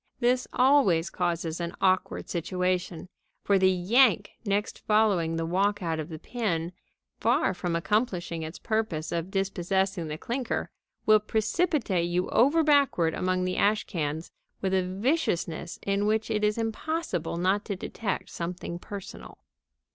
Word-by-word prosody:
This 250 Hz, +1 st, +2 dB
always 250 Hz, -, +4 dB
causes 170 Hz, -2 st, -2 dB
an 170 Hz, 0 st, -4 dB
awkward 185 Hz, -1 st, +1 dB
situation, 180 Hz, 0 st, -2 dB, 0.4 s
for 200 Hz, -1 st, +3 dB
the 190 Hz, 0 st, +5 dB
yank 205 Hz, +4 st, +3 dB
next 205 Hz, -1 st, -1 dB
following 200 Hz, -7 st, +2 dB
the 165 Hz, 0 st, -1 dB
walkout 185 Hz, -2 st, 0 dB
of 155 Hz, +1 st, -5 dB
the 160 Hz, -, -6 dB
pin, 175 Hz, -5 st, -2 dB, 0.5 s
far -, -, +2 dB
from 175 Hz, -2 st, -2 dB
accomplishing 175 Hz, -3 st, -1 dB
its 160 Hz, +2 st, -6 dB
purpose 215 Hz, -9 st, -2 dB
of 170 Hz, +1 st, -2 dB
dispossessing 190 Hz, -2 st, -1 dB
the 150 Hz, 0 st, -4 dB
clinker, 245 Hz, +6 st, -3 dB, 0.3 s
will 215 Hz, 0 st, +6 dB
precipitate 215 Hz, -, 0 dB
you 180 Hz, +1 st, 0 dB
over 290 Hz, +7 st, +4 dB
backward 280 Hz, -, +3 dB
among 185 Hz, 0 st, 0 dB
the 185 Hz, -, -2 dB
ash 210 Hz, +1 st, +3 dB
cans 155 Hz, -1 st, -3 dB, 0.3 s
with 190 Hz, -1 st, -1 dB
a 190 Hz, -, +3 dB
viciousness 185 Hz, -, -1 dB
in 200 Hz, +1 st, +1 dB
which 220 Hz, +1 st, 0 dB
it 210 Hz, -1 st, 0 dB
is 210 Hz, +1 st, +2 dB
impossible 225 Hz, -, -2 dB
not 190 Hz, +4 st, +1 dB
to 200 Hz, -, -3 dB
detect 195 Hz, +2 st, -4 dB
something 175 Hz, 0 st, -5 dB
personal. 195 Hz, +1 st, -9 dB
190 Hz, 140 wpm, -27 LUFS, 170-215 Hz, 0.5 s, will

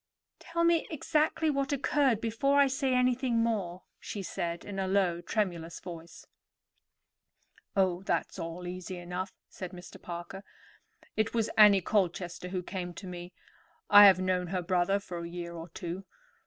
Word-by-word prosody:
"Tell 335 Hz, 0 st, -2 dB
me 335 Hz, -1 st, +3 dB
exactly 315 Hz, 0 st, +1 dB
what 275 Hz, -1 st, -1 dB
occurred 275 Hz, -4 st, +2 dB
before 275 Hz, +5 st, +2 dB
I 280 Hz, -, +7 dB
say 265 Hz, -1 st, 0 dB
anything 250 Hz, -1 st, +2 dB
more," 190 Hz, -6 st, -2 dB, 0.2 s
she 200 Hz, -, -6 dB
said 170 Hz, -1 st, -4 dB
in 200 Hz, -1 st, -5 dB
a 190 Hz, -, -1 dB
low, 185 Hz, -3 st, +1 dB
tremulous 175 Hz, -4 st, -2 dB
voice. 170 Hz, -2 st, -10 dB, 1.5 s
"Oh, 185 Hz, -2 st, +2 dB
that's 195 Hz, -, -2 dB
all 165 Hz, +2 st, -5 dB
easy 180 Hz, +1 st, -6 dB
enough," 180 Hz, +2 st, -5 dB, 0.2 s
said 185 Hz, -1 st, -8 dB
Mr. 180 Hz, -1 st, -11 dB
Parker. 175 Hz, +3 st, -7 dB, 0.7 s
"It 220 Hz, +2 st, 0 dB
was 225 Hz, -1 st, +1 dB
Annie 205 Hz, -3 st, +7 dB
Colchester 180 Hz, -2 st, -1 dB
who 180 Hz, -1 st, -3 dB
came 175 Hz, -2 st, -5 dB
to 195 Hz, -, -8 dB
me. 175 Hz, -1 st, -7 dB, 0.6 s
I 205 Hz, 0 st, +11 dB
have 190 Hz, -2 st, +6 dB
known 185 Hz, -1 st, 0 dB
her 180 Hz, 0 st, -2 dB
brother 185 Hz, +2 st, +2 dB
for 180 Hz, -3 st, -7 dB
a 170 Hz, 0 st, -6 dB
year 170 Hz, 0 st, -6 dB
or 165 Hz, 0 st, -8 dB
two. 175 Hz, +3 st, -6 dB
185 Hz, 155 wpm, -30 LUFS, 175-225 Hz, 1.5 s, I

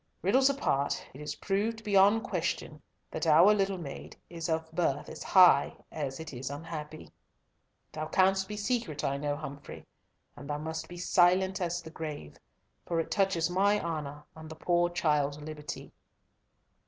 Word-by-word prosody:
Riddles 260 Hz, +9 st, +4 dB
apart, 145 Hz, -, 0 dB
it 135 Hz, -, -10 dB
is 150 Hz, -, -4 dB
proved 220 Hz, +3 st, -1 dB
beyond 205 Hz, +1 st, +4 dB
question -, -, -3 dB, 0.3 s
that -, -, -3 dB
our 170 Hz, +7 st, +7 dB
little 195 Hz, -2 st, 0 dB
maid 145 Hz, -6 st, -8 dB
is 165 Hz, -1 st, -4 dB
of 160 Hz, 0 st, -1 dB
birth 160 Hz, -4 st, 0 dB
as -, -, -9 dB
high 185 Hz, -2 st, +5 dB
as 140 Hz, -3 st, -4 dB
it 160 Hz, -2 st, -7 dB
is 130 Hz, +2 st, -5 dB
unhappy. 155 Hz, +1 st, -7 dB, 0.8 s
Thou 155 Hz, 0 st, -4 dB
canst 190 Hz, +2 st, +3 dB
be 210 Hz, +1 st, -6 dB
secret, 205 Hz, -, -2 dB
I 140 Hz, 0 st, 0 dB
know, 145 Hz, 0 st, -1 dB
Humfrey, 145 Hz, -2 st, -8 dB, 0.5 s
and 140 Hz, -, -10 dB
thou 145 Hz, -, -1 dB
must 160 Hz, +1 st, -5 dB
be 175 Hz, -, -10 dB
silent 185 Hz, +2 st, +3 dB
as 175 Hz, 0 st, -2 dB
the 160 Hz, -, -10 dB
grave, 150 Hz, -, -7 dB, 0.4 s
for 170 Hz, -, -1 dB
it 165 Hz, -, -3 dB
touches 190 Hz, -5 st, +2 dB
my 200 Hz, +4 st, +2 dB
honour 150 Hz, -4 st, -4 dB
and 160 Hz, 0 st, -10 dB
the 160 Hz, -, -8 dB
poor 175 Hz, +2 st, +1 dB
child's 150 Hz, -4 st, 0 dB
liberty." 150 Hz, 0 st, -7 dB
165 Hz, 160 wpm, -30 LUFS, 150-190 Hz, 0.8 s, our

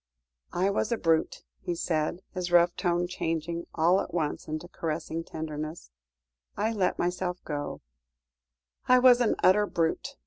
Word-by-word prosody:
"I 190 Hz, +3 st, +2 dB
was 215 Hz, +3 st, -1 dB
a 235 Hz, -, +1 dB
brute," 165 Hz, -4 st, +1 dB, 0.2 s
he 175 Hz, -, -3 dB
said, 165 Hz, +2 st, -1 dB
his 180 Hz, -2 st, -3 dB
rough 175 Hz, 0 st, +5 dB
tone 175 Hz, 0 st, +1 dB
changing 170 Hz, -1 st, -3 dB
all 170 Hz, +4 st, +4 dB
at -, -, -7 dB
once 155 Hz, -4 st, -2 dB
into 155 Hz, +2 st, -4 dB
caressing 165 Hz, -1 st, -4 dB
tenderness; 155 Hz, -, -6 dB, 0.7 s
"I 220 Hz, +2 st, +1 dB
let 190 Hz, -4 st, 0 dB
myself 180 Hz, 0 st, -1 dB
go 145 Hz, -2 st, -4 dB, 1.1 s
I 255 Hz, -, +7 dB
was 250 Hz, -1 st, +6 dB
an 235 Hz, -, +2 dB
utter 205 Hz, +3 st, +5 dB
brute. 170 Hz, +13 st, -1 dB
175 Hz, 145 wpm, -28 LUFS, 160-185 Hz, 1.1 s, I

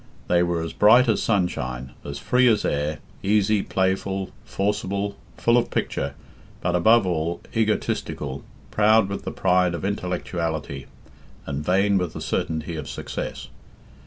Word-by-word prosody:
They 85 Hz, 0 st, +3 dB
were 85 Hz, -1 st, 0 dB
as 80 Hz, -, -5 dB
bright 120 Hz, +5 st, +6 dB
as 110 Hz, -, +2 dB
sunshine, 65 Hz, -, -1 dB
as 70 Hz, 0 st, -6 dB
free 125 Hz, -, +3 dB
as 110 Hz, -3 st, +3 dB
air, 75 Hz, +1 st, -1 dB, 0.2 s
easy, 105 Hz, +1 st, +2 dB
playful, 95 Hz, 0 st, -1 dB
forcible, 100 Hz, 0 st, -2 dB, 0.2 s
full 120 Hz, +1 st, +4 dB
of 120 Hz, -, -2 dB
picture, 70 Hz, +1 st, -2 dB, 0.4 s
but, 90 Hz, 0 st, 0 dB
above 110 Hz, +5 st, +5 dB
all, 85 Hz, -1 st, -1 dB, 0.2 s
egotistical, 90 Hz, -10 st, -1 dB, 0.3 s
proud 110 Hz, -1 st, +4 dB
with 100 Hz, -, -5 dB
the -, -, -3 dB
pride 90 Hz, -2 st, +2 dB
of 85 Hz, -, -4 dB
intellectuality, 85 Hz, -7 st, -3 dB, 0.6 s
and 70 Hz, +1 st, -3 dB
vain 95 Hz, +4 st, +3 dB
with 90 Hz, -3 st, -3 dB
the -, -, -6 dB
certainty 80 Hz, +1 st, -2 dB
of 75 Hz, -, -6 dB
success. -, -, -5 dB
90 Hz, 140 wpm, -24 LUFS, 80-105 Hz, 0.6 s, bright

